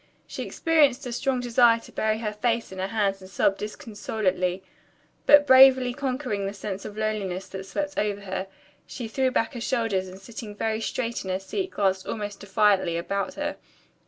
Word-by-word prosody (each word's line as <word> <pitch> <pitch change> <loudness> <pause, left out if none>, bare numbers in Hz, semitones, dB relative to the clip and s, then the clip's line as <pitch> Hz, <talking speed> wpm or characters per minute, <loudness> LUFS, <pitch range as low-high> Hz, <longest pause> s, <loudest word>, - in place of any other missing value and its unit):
She - - -7
experienced 295 -6 +2
a 245 - -4
strong 255 +1 0
desire 240 -1 +4
to - - -14
bury 220 0 0
her 215 -2 -3
face 230 +1 -1
in 190 - -8
her 190 - -1
hands 200 -2 0
and 185 - -12
sob 195 0 +1
disconsolately, 195 -4 -2 0.6
but 290 0 +8
bravely 260 -2 +7
conquering 255 -7 -2
the 200 - -5
sense 200 -1 -5
of 210 0 -8
loneliness 200 -4 -2
that 190 0 -7
swept 290 +9 -3
over 205 -1 -1
her, 190 -1 -4 0.4
she 240 -3 -6
threw 260 +4 +1
back 225 -3 0
her 240 - -6
shoulders 225 -7 0
and 185 +1 -10
sitting 210 +1 -9
very 220 +1 -1
straight 235 +1 -2
in 190 - -6
her 185 - 0
seat 370 - -3
glanced 190 -2 0
almost 205 -2 -4
defiantly 195 -3 +2
about 200 +9 -2
her. 295 0 -3
215 Hz, 185 wpm, -26 LUFS, 195-245 Hz, 0.6 s, but